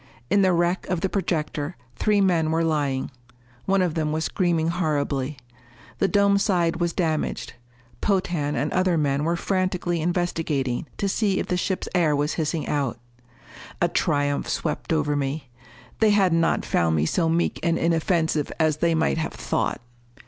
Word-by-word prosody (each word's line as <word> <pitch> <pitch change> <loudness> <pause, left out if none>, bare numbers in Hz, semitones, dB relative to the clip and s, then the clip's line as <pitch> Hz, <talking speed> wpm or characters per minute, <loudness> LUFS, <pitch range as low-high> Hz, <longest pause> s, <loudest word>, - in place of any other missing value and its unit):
In 205 - +4
the 190 -1 +4
wreck 175 +1 +1
of 180 -3 -1
the 190 - 0
projector, 165 -4 -2 0.2
three 210 -2 +2
men 170 -5 +2
were 165 +1 +1
lying. 145 -5 0 0.5
One 195 -1 +3
of 175 -3 0
them 155 -2 -1
was 160 +1 -1
screaming 170 -3 +1
horribly. 150 -5 -1 0.6
The 195 - +3
dome 200 +1 +3
side 175 -5 +1
was 170 -1 +1
damaged. 160 -3 -2 0.5
Potan 175 -7 0
and 145 +2 -1
other 185 -2 +2
men 145 -1 +1
were 170 +1 +1
frantically 180 -2 -1
investigating 160 -7 -1
to 200 - -1
see 195 -1 +1
if - - -3
the 180 - +1
ship's 185 +1 -2
air 165 -5 +3
was 145 +2 0
hissing 160 -1 -2
out. 140 -5 -1 0.8
A - - +3
triumph 145 -1 0
swept - - -2
over 150 -2 +1
me. 135 -1 -3 0.5
They 220 - +5
had 195 -4 +4
not 165 0 +2
found 80 -1 +1
me 75 0 +2
so 165 - +1
meek 170 +1 0
and 170 0 +1
inoffensive 165 -2 +1
as 155 -2 +2
they 165 +1 +2
might 160 0 +1
have 160 - -3
thought! - - -2
165 Hz, 165 wpm, -24 LUFS, 150-180 Hz, 0.8 s, They